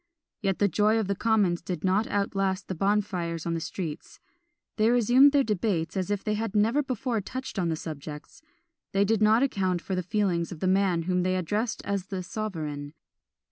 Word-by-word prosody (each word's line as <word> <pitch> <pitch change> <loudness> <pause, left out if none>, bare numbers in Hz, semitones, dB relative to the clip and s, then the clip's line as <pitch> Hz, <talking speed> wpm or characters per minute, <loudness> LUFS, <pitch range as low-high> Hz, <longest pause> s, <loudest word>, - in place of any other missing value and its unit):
Yet 195 -3 0
the 205 - +3
joy 210 +3 +2
of 220 - +1
the 200 - +1
commons 205 -6 +2
did 175 +1 -5
not 195 +4 +2
outlast 195 -2 -1
the - - -3
bonfires 185 -3 -1
in 170 - -1
the 165 - -1
streets; 160 -1 -6 0.6
they 215 +1 +4
resumed 245 +4 +6
their 280 -1 +4
debates 185 -6 -1
as 185 -1 -1
if 205 -1 -1
they 215 - 0
had 215 0 -3
never 225 +7 +3
before 255 -4 -2
touched 255 +2 -5
on 175 -2 0
the 160 - 0
subjects: 150 - -8 0.5
they 195 +1 +3
did 220 +1 +1
not 220 +4 +5
account 190 -9 0
for 190 - -5
the 185 - 0
feelings 180 -2 0
of 170 - -7
the - - -2
man 185 -2 +2
whom 180 +1 +1
they 185 +1 +1
addressed 210 +6 -2
as 200 -2 -2
the 190 -2 -4
sovereign. 155 -8 -5
195 Hz, 195 wpm, -27 LUFS, 175-215 Hz, 0.6 s, resumed